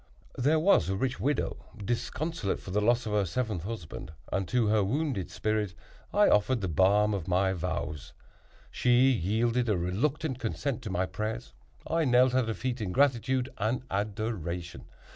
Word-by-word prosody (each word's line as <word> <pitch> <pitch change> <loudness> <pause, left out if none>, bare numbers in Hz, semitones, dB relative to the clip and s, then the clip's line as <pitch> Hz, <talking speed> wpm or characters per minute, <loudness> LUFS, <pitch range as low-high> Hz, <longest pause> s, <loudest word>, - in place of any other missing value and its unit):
There 145 +6 +3
was 155 - +4
a 95 - 0
rich 130 +5 -1
widow 145 +2 0 0.2
disconsolate 120 - -2
for 95 - -9
the 105 +3 +1
loss 120 +3 +2
of 110 - -3
her 105 -1 +2
seventh 105 -2 -2
husband, 100 -8 -6 0.2
and 95 -1 0
to 125 -2 +2
her 105 -1 +3
wounded 130 - -1
spirit 105 -1 -1 0.4
I 205 0 +5
offered 115 +3 +3
the 95 - -1
balm 100 +6 +3
of 95 -4 -3
my 95 +1 +2
vows. 75 -5 -4 0.6
She 125 +2 +4
yielded 115 +3 +1
a 105 - +2
reluctant 130 - -1
consent 125 +2 -2
to 110 - -6
my 95 0 0
prayers. 110 +5 -4 0.3
I 165 -1 +1
knelt 125 0 +4
at 130 -3 +2
her 115 - -1
feet 125 -2 -3
in 100 -4 -2
gratitude 130 0 +2
and 115 +4 0
adoration. 95 - -3
110 Hz, 165 wpm, -29 LUFS, 95-125 Hz, 0.6 s, I